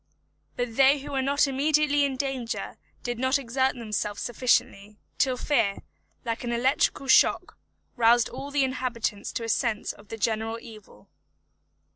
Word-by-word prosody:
But 245 -2 -4
they 275 +1 +6
who 285 +1 -8
were 270 -1 0
not 280 +2 +2
immediately 290 +1 +2
in 275 -1 -2
danger 265 -4 -4 0.3
did 240 -1 -3
not 260 +2 +2
exert 265 0 0
themselves 210 -3 -3
sufficiently, 210 -4 0 0.2
till 260 -2 +2
fear, 230 -8 0 0.4
like 230 0 -3
an 240 - -3
electrical 265 +3 +1
shock, 260 - +4 0.4
roused 235 -1 +4
all 270 +3 -7
the 285 -1 +1
inhabitants 250 -5 -2
to 235 - -3
a - - -4
sense 225 -2 -1
of 205 - -18
the 225 - -7
general 225 +1 -1
evil. 215 - -14
245 Hz, 150 wpm, -26 LUFS, 225-270 Hz, 0.4 s, they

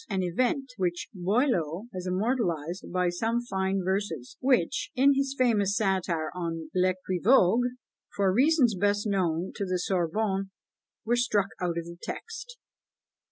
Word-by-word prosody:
An 190 -2 0
event 255 - 0
which 175 -2 -2
Boileau 190 - 0
has 185 0 -5
immortalised 185 - -1
by 180 0 +1
some 225 +7 0
fine 190 -4 -1
verses, 185 -9 -2
which, 250 -9 +1
in 275 +2 +5
his 275 0 -1
famous 210 -6 +2
satire 185 -6 0
on 165 -3 -4
L'Equivoque, 185 +5 +3 0.5
for 195 -2 +2
reasons 265 - +4
best 205 +2 +1
known 185 -4 0
to - - -4
the 185 -1 -1
Sorbonne, 190 +2 -1 0.6
were 235 +2 +2
struck 210 -5 +1
out 175 -2 -1
of 170 - -3
the 170 0 -9
text. - - -7
190 Hz, 135 wpm, -28 LUFS, 175-235 Hz, 0.6 s, in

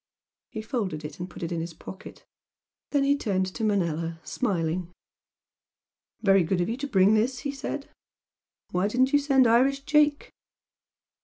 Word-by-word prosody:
He 220 -2 -6
folded 200 - -3
it 150 +2 -8
and 180 +1 -5
put - - -9
it 165 - -3
in 170 -1 -2
his 165 0 -6
pocket. 185 - -11 0.6
Then 285 -1 +2
he 280 +1 +3
turned 195 -9 0
to 225 - -5
Manella, 170 -5 0
smiling. 175 -6 -2 1.3
"Very 195 -2 +5
good 180 +2 0
of 175 - 0
you 235 - -2
to 285 +2 -4
bring 200 -4 +4
this!" 240 +4 +1
he 280 - -2
said 280 +1 -5 0.8
"Why 180 +2 +1
didn't 255 +5 +2
you 290 - +6
send 275 -2 +4
Irish 260 +4 +3
Jake?" 295 0 +2
215 Hz, 160 wpm, -26 LUFS, 180-270 Hz, 1.3 s, you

